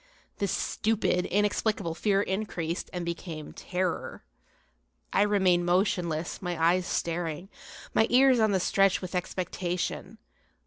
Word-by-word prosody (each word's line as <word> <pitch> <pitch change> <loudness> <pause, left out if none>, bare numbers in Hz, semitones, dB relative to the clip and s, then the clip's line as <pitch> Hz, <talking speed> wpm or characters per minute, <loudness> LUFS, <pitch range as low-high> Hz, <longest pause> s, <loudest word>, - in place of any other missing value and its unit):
This 200 -3 0
stupid, 215 -5 0
inexplicable 205 -3 0
fear 200 +3 +1
increased, 190 -5 -3
and 175 -1 -4
became 165 -2 -6
terror. 180 - -3 0.9
I - - +4
remained 190 -4 +3
motionless, 175 -3 0
my 175 -3 -3
eyes 175 +2 +3
staring, 170 +1 -2 0.4
my 220 - +4
ears 260 0 +5
on 220 -1 +4
the 195 -2 +2
stretch 195 +1 +3
with 185 0 -7
expectation. 180 -1 -3
180 Hz, 120 wpm, -28 LUFS, 175-205 Hz, 0.9 s, ears